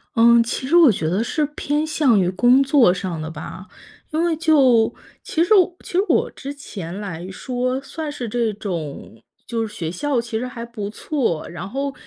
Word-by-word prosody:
嗯， 235 +1 +6
其 255 +2 -4
实 320 - +2
我 330 -7 +8
觉 160 -6 -2
得 190 +6 0
是 300 +5 0
偏 295 +2 -1
向 295 -9 +3
于 180 -2 +2
工 245 +8 +4
作 270 -8 +4
上 180 -3 -4
的 155 - -5
吧。 180 +3 -9 0.4
因 315 +1 0
为 340 -1 +1
就 275 -8 +4 0.3
其 325 - -1
实 350 +5 +4
我 365 -3 +4
其 - - -11
实 365 - +4
我 - - +2
之 280 +1 -7
前 195 -10 -7
来 185 -3 -6
说 255 +4 -2
算 305 +2 -6
是 250 -4 -5
这 230 0 0
种 170 - -6 0.2
就 230 -1 -1
是 210 - -9
学 165 -2 -4
校 260 - -1
其 235 -1 -3
实 240 - -3
还 235 -2 -7
不 220 -4 -6
错， 225 - -2
然 175 +2 -7
后 275 +4 -3
235 Hz, 215 characters per minute, -21 LUFS, 190-285 Hz, 0.4 s, 我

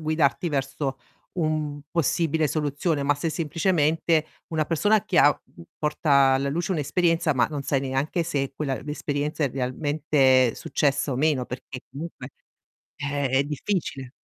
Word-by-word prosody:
guidarti 155 -1 +1
verso 135 -1 -2 0.3
un 155 -3 -1
possibile 160 -1 +1
soluzione, 150 +1 -1
ma 145 0 +2
se 165 +3 -2
semplicemente 160 -1 +1 0.3
una 155 -1 +1
persona 205 +5 +2
che - - +1
ha, - - +8 0.3
uhm, 85 - -11
porta 150 0 -2 0.2
alla 135 +1 0
luce 170 +6 -2
un'esperienza, 165 0 +1
ma 120 -2 +3
non 145 -2 -4
sai 135 0 0
neanche 135 +5 -1
se 140 -5 -2
quella 135 -2 -2
l'esperienza 150 +1 -3
è 140 - +1
realmente 130 -1 +2
successa 140 0 0
o 125 - -1
meno, 145 -3 +2
perché 125 +1 -8
comunque 140 -1 -8 0.7
Eh, 145 -1 -2
è 130 +2 +2
difficile. 145 -3 -3
145 Hz, 145 wpm, -25 LUFS, 135-160 Hz, 0.7 s, ha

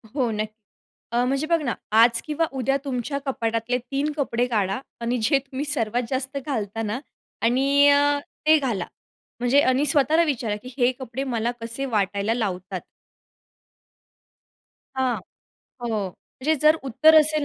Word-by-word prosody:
हो, 255 -5 +1
नक्की. 215 0 -3 0.6
अ, 240 +1 +3
म्हणजे 275 +4 0
बघ 335 -1 +2
ना, 250 -6 -1 0.2
आज 230 +2 +5
किंवा 310 +2 0
उद्या 270 +2 +1
तुमच्या 270 +1 -2
कपाटातले 230 -2 -1
3 280 +2 0
कपडे 245 -4 0
काढा 205 -4 0 0.2
आणि 235 +1 0
अ, - - -3
जे 275 +4 +4
तुम्ही 270 +1 -5
सर्वात 245 -5 -1
जास्त 265 +1 -2
घालता 225 -6 -3
ना 220 +2 -2 0.4
आणि 275 +4 +4
अ, 285 0 +4 0.3
ते 315 0 +7
घाला. 235 - -1 0.5
म्हणजे 245 +4 +4
आणि 260 +2 +2
स्वतःला 300 +3 +3
विचारा 240 -9 -1
की 250 - -8
हे 245 -1 +4
कपडे 260 +1 -4
मला 240 -3 -1
कसे 230 +4 -3
वाटायला 205 -2 0
लावतात. 190 -5 -3 2.2
हां. 260 -2 +1 0.7
हो. 240 - -2 0.2
म्हणजे 265 - -3
जर 305 +1 +7
उत्तर 305 +5 +5
असेल 305 -1 +1
255 Hz, 150 wpm, -24 LUFS, 230-285 Hz, 2.2 s, ते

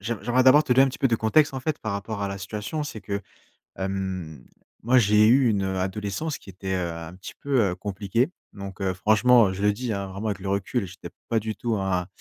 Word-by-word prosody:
j'aim 110 +2 -3
j'aimerais 125 +2 +2
d'abord 140 +4 +7
te 130 - +2
donner 130 +2 +6
un - - +1
petit 130 - -7
peu - - +3
de 120 - +2
contexte 135 +7 +3
en 130 - -3
fait 155 +3 -2
par 110 - -4
rapport 100 +1 -4
à - - 0
la 100 0 -5
situation. 105 +10 -4
C'est 130 -7 -6
que, 100 0 -3 0.6
hem, 95 -7 -4 0.4
moi 125 +3 +3
j'ai 105 -1 +5
eu 125 +2 +5
une, 100 -3 +1
heu, 95 0 -2
adolescence 100 +10 -3
qui - - -15
était, 95 0 -5
heu, 90 -2 -1
un 85 +1 -8
petit 95 +1 -10
peu, 135 -4 +1
heu, - - -4
compliquée 100 - -1 0.2
donc 100 -1 -8
heu, 95 -1 0
franchement, 110 +3 +5
heu, - - -3
je 95 - -6
le 105 - +4
dis, 120 +1 -3
hein, 100 -1 -3
vraiment 100 +3 -4
avec 100 -2 -3
le 95 0 -4
recul, 100 +2 -1
j'étais 90 - -10 0.2
pas 115 - +2
du 110 0 -4
tout 115 -2 -1
un, 95 -2 -1
105 Hz, 250 wpm, -25 LUFS, 95-120 Hz, 0.6 s, d'abord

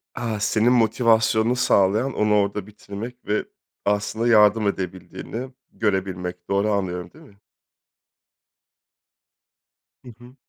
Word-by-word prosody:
A! 115 -3 -3
Senin 110 +3 +2
motivasyonunu 115 0 +3
sağlayan 110 +2 +2
onu 105 0 +2
orda 100 0 0
bitirmek 105 +4 -9
ve 105 +1 0 0.4
aslında 105 +3 0
yardım 105 -2 +5
edebildiğini 95 +7 -5 0.2
görebilmek, 95 -4 -3
doğru 100 +2 +1
anlıyorum, 90 -3 -2
değil 160 +1 -16
mi? 100 -7 -21 2.7
Hı - - -10
hı. 125 +2 -15
105 Hz, 105 wpm, -23 LUFS, 100-115 Hz, 2.7 s, yardım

